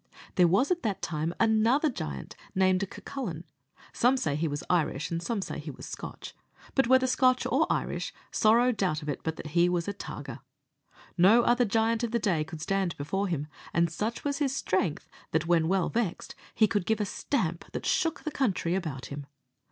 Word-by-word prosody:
There 180 Hz, -2 st, +5 dB
was 200 Hz, -, +3 dB
at 350 Hz, -1 st, +1 dB
that 200 Hz, -4 st, -2 dB
time 155 Hz, +1 st, -1 dB
another 230 Hz, +7 st, +3 dB
giant, 70 Hz, -, -6 dB, 0.2 s
named 185 Hz, 0 st, +2 dB
Cucullin 190 Hz, -, -6 dB, 0.5 s
some 250 Hz, +3 st, +3 dB
say 145 Hz, -, 0 dB
he 160 Hz, +2 st, 0 dB
was 145 Hz, -1 st, -3 dB
Irish, 155 Hz, -4 st, 0 dB
and 165 Hz, 0 st, -1 dB
some 210 Hz, +1 st, -2 dB
say -, -, -5 dB
he -, -, -7 dB
was -, -, -9 dB
Scotch -, -, -7 dB, 0.4 s
but 270 Hz, -3 st, +3 dB
whether 260 Hz, +1 st, +5 dB
Scotch 255 Hz, 0 st, +3 dB
or -, -, +2 dB
Irish, -, -, -2 dB, 0.2 s
sorrow 235 Hz, +3 st, +4 dB
doubt 180 Hz, -9 st, -1 dB
of 150 Hz, -, -5 dB
it 145 Hz, -, -3 dB
but 160 Hz, 0 st, -4 dB
he 170 Hz, +3 st, +3 dB
was 175 Hz, 0 st, -1 dB
a 200 Hz, -, -1 dB
targer. -, -, -7 dB, 0.8 s
No 215 Hz, +7 st, +7 dB
other 245 Hz, +1 st, +3 dB
giant 225 Hz, +2 st, +1 dB
of 235 Hz, -, 0 dB
the 235 Hz, -, +1 dB
day 185 Hz, -8 st, +1 dB
could 160 Hz, 0 st, -9 dB
stand 195 Hz, 0 st, -1 dB
before 195 Hz, +8 st, -1 dB
him; 155 Hz, -5 st, -2 dB, 0.3 s
and 170 Hz, -1 st, +2 dB
such 215 Hz, +7 st, -3 dB
was 285 Hz, -1 st, -1 dB
his 275 Hz, -2 st, 0 dB
strength, 185 Hz, -, -1 dB, 0.3 s
that, 160 Hz, -, +2 dB
when 165 Hz, -1 st, +3 dB
well 185 Hz, 0 st, +2 dB
vexed, 225 Hz, -7 st, -2 dB, 0.2 s
he 215 Hz, -, +5 dB
could 205 Hz, -3 st, -1 dB
give 220 Hz, -1 st, +2 dB
a 210 Hz, -, +1 dB
stamp 180 Hz, -, -2 dB
that -, -, -5 dB
shook 330 Hz, -4 st, +1 dB
the 310 Hz, -, -3 dB
country 195 Hz, -11 st, 0 dB
about 155 Hz, -9 st, -3 dB
him. 140 Hz, -1 st, -7 dB
195 Hz, 195 wpm, -29 LUFS, 165-235 Hz, 0.8 s, No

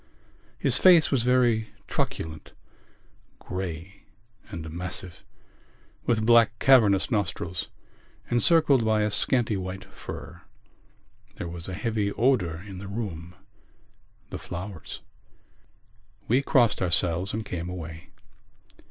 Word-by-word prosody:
His -, -, 0 dB
face 175 Hz, -4 st, +6 dB
was 135 Hz, -4 st, +3 dB
very 120 Hz, -3 st, +2 dB
truculent, 80 Hz, -1 st, -4 dB, 0.8 s
grey 90 Hz, 0 st, -6 dB, 0.4 s
and 80 Hz, -1 st, -6 dB
massive, 90 Hz, +1 st, -6 dB, 0.8 s
with 110 Hz, -2 st, +2 dB
black 115 Hz, -1 st, +5 dB
cavernous 110 Hz, -7 st, +5 dB
nostrils 95 Hz, -4 st, -2 dB, 0.6 s
and 120 Hz, 0 st, +1 dB
circled 155 Hz, -7 st, +4 dB
by 110 Hz, -1 st, +2 dB
a 105 Hz, -, 0 dB
scanty 115 Hz, -1 st, +2 dB
white 95 Hz, 0 st, -5 dB
fur. -, -, -9 dB, 0.9 s
There -, -, -5 dB
was 85 Hz, +1 st, -7 dB
a 90 Hz, -, -4 dB
heavy 105 Hz, -1 st, -1 dB
odour 95 Hz, -10 st, +1 dB
in 95 Hz, -2 st, -8 dB
the 100 Hz, -, -7 dB
room—the 95 Hz, -5 st, -10 dB
flowers. 90 Hz, -1 st, -7 dB, 1.3 s
We 125 Hz, +5 st, +3 dB
blessed 120 Hz, -5 st, +3 dB
ourselves 90 Hz, +1 st, +1 dB
and 110 Hz, 0 st, -3 dB
came 85 Hz, -1 st, -4 dB
away. 80 Hz, -2 st, -8 dB
100 Hz, 110 wpm, -26 LUFS, 90-115 Hz, 1.3 s, face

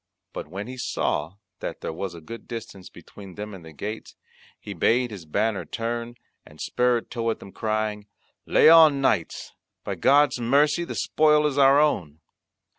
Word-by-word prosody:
But -, -, -6 dB
when 95 Hz, +6 st, -6 dB
he 130 Hz, +2 st, -8 dB
saw 80 Hz, -8 st, -2 dB, 0.2 s
that -, -, -6 dB
there -, -, -4 dB
was 90 Hz, +1 st, -5 dB
a 85 Hz, -, -11 dB
good 115 Hz, +8 st, -10 dB
distance 110 Hz, -5 st, -8 dB
between 95 Hz, -3 st, -13 dB
them 105 Hz, 0 st, -7 dB
and 95 Hz, -3 st, -11 dB
the 80 Hz, -, -12 dB
gates, 105 Hz, +9 st, -7 dB, 0.4 s
he -, -, -8 dB
bade 120 Hz, +1 st, +1 dB
his 95 Hz, -6 st, -9 dB
banner 105 Hz, +5 st, -1 dB
turn, 120 Hz, +1 st, -4 dB, 0.3 s
and 75 Hz, -, -18 dB
spurred 125 Hz, -1 st, 0 dB
toward 115 Hz, -2 st, -2 dB
them 100 Hz, -, -12 dB
crying, 110 Hz, -1 st, -3 dB, 0.4 s
"Lay -, -, +5 dB
on, 160 Hz, -3 st, +7 dB
knights, 135 Hz, -, -1 dB, 0.3 s
by -, -, -3 dB
God's 140 Hz, -2 st, +3 dB
mercy 145 Hz, +7 st, +2 dB
the -, -, -6 dB
spoil 150 Hz, -1 st, +3 dB
is 145 Hz, -1 st, 0 dB
our 135 Hz, +1 st, +6 dB
own." 85 Hz, -, 0 dB
115 Hz, 170 wpm, -24 LUFS, 100-135 Hz, 0.4 s, on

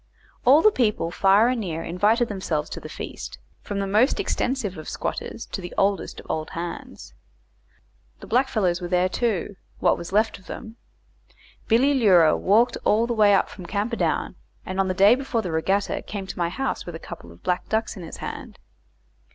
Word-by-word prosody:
All 285 Hz, +5 st, +7 dB
the 430 Hz, -, +7 dB
people 210 Hz, -, 0 dB
far 195 Hz, +5 st, +4 dB
and 250 Hz, -2 st, 0 dB
near 165 Hz, -5 st, -4 dB
invited 215 Hz, +7 st, +2 dB
themselves 180 Hz, -7 st, -3 dB
to -, -, -5 dB
the -, -, -9 dB
feast, -, -, -7 dB, 0.2 s
from 205 Hz, -, -5 dB
the 200 Hz, -, -1 dB
most 215 Hz, +7 st, +2 dB
extensive 250 Hz, -7 st, -1 dB
of 155 Hz, -2 st, -8 dB
squatters -, -, -4 dB
to 195 Hz, -, -4 dB
the 175 Hz, -, -8 dB
oldest 195 Hz, -1 st, 0 dB
of -, -, -12 dB
old 155 Hz, 0 st, -3 dB
hands. 170 Hz, 0 st, -7 dB, 1.1 s
The -, -, -10 dB
blackfellows 215 Hz, -8 st, +1 dB
were 175 Hz, -, -3 dB
there, 180 Hz, +1 st, +2 dB
too 205 Hz, -2 st, -1 dB, 0.2 s
what -, -, +2 dB
was 170 Hz, -, -7 dB
left 215 Hz, +1 st, +1 dB
of 190 Hz, -, -21 dB
them. 225 Hz, -1 st, -8 dB, 0.9 s
Billy 255 Hz, +6 st, +4 dB
Leura 185 Hz, -, +5 dB
walked 220 Hz, +6 st, +3 dB
all 220 Hz, +2 st, +3 dB
the 240 Hz, -, -1 dB
way 205 Hz, -3 st, +5 dB
from 180 Hz, -3 st, -11 dB
Camperdown, 210 Hz, +5 st, -1 dB, 0.3 s
and 185 Hz, +1 st, -4 dB
on 195 Hz, -, +2 dB
the 185 Hz, -, -1 dB
day 200 Hz, +4 st, +7 dB
before 255 Hz, -3 st, -1 dB
the 180 Hz, -, -3 dB
regatta 190 Hz, +5 st, 0 dB
came 200 Hz, -2 st, -6 dB
to 190 Hz, -, -7 dB
my 170 Hz, -1 st, +1 dB
house 265 Hz, +9 st, -3 dB
with 175 Hz, -, -7 dB
a 165 Hz, -, -10 dB
couple 85 Hz, -, -9 dB
of 85 Hz, -, -18 dB
black 180 Hz, 0 st, -1 dB
ducks 220 Hz, +1 st, -1 dB
in 190 Hz, -, -8 dB
his 165 Hz, -, -8 dB
hand. -, -, -7 dB
200 Hz, 190 wpm, -24 LUFS, 180-230 Hz, 1.1 s, All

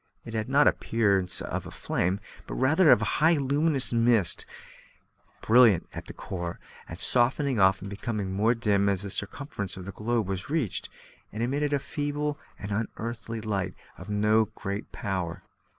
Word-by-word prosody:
It 115 Hz, -, -8 dB
had 110 Hz, +2 st, -2 dB
not 140 Hz, +2 st, +5 dB
the -, -, +6 dB
appearance 100 Hz, -5 st, 0 dB
of -, -, -4 dB
flame, 90 Hz, +3 st, -1 dB, 0.3 s
but -, -, -5 dB
rather 155 Hz, +6 st, +4 dB
of 105 Hz, -, +6 dB
highly 160 Hz, +9 st, +3 dB
luminous 140 Hz, -1 st, +1 dB
mist, 115 Hz, -6 st, +3 dB, 1.0 s
brilliant 115 Hz, -5 st, +5 dB
at -, -, -7 dB
the -, -, -8 dB
core, 85 Hz, -2 st, -5 dB, 0.3 s
and 80 Hz, -, -7 dB
softening 130 Hz, +2 st, +2 dB
off 95 Hz, 0 st, +4 dB
and 100 Hz, -, -6 dB
becoming 100 Hz, -1 st, -3 dB
more 110 Hz, +5 st, +2 dB
dim 100 Hz, -3 st, +2 dB
as 100 Hz, 0 st, +1 dB
the 100 Hz, -, -4 dB
circumference 105 Hz, -, -4 dB
of 90 Hz, -, -8 dB
the 100 Hz, -, -5 dB
globe 110 Hz, +1 st, -1 dB
was 95 Hz, +2 st, -4 dB
reached; 145 Hz, -, -1 dB, 0.4 s
and 110 Hz, +2 st, -3 dB
it -, -, +3 dB
emitted 145 Hz, +3 st, 0 dB
a 145 Hz, -, +3 dB
feeble 145 Hz, +1 st, -3 dB, 0.2 s
and 100 Hz, -, -7 dB
unearthly 115 Hz, +2 st, -4 dB
light 100 Hz, -4 st, -2 dB, 0.2 s
of 90 Hz, +4 st, -11 dB
no 105 Hz, +2 st, +3 dB
great 100 Hz, -1 st, -6 dB
power. 90 Hz, -4 st, -3 dB
110 Hz, 165 wpm, -27 LUFS, 100-130 Hz, 1.0 s, the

